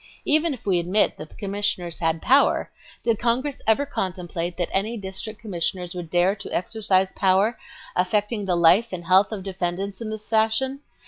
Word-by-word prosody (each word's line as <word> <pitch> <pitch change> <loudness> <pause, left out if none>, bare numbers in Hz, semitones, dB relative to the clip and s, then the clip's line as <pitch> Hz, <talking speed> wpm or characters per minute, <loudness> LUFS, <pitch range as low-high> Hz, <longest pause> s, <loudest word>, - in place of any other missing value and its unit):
"Even 310 +2 +3
if 260 - -7
we 185 -3 +2
admit 180 +5 +2
that 155 - -9
the - - -18
Commissioners 200 -4 -2
had 165 -1 0
power, 270 +3 +3 0.3
did 230 -2 +1
Congress 255 +4 -1
ever 225 +6 +3
contemplate 180 -7 -4
that 175 -2 -1
any 215 +5 -1
District 195 +2 -6
Commissioners 180 -3 -3
would 175 -3 -6
dare 180 +3 +3
to 200 - -8
exercise 190 0 +1
power 195 +4 +2 0.4
affecting 205 +3 0
the 180 -2 +1
life 185 +7 +5
and 175 -2 -5
health 190 +4 +4
of 205 -3 -5
defendants 190 +1 -3
in 225 - -4
this 215 -1 -7
fashion? 225 +5 +1
195 Hz, 175 wpm, -24 LUFS, 180-220 Hz, 0.4 s, life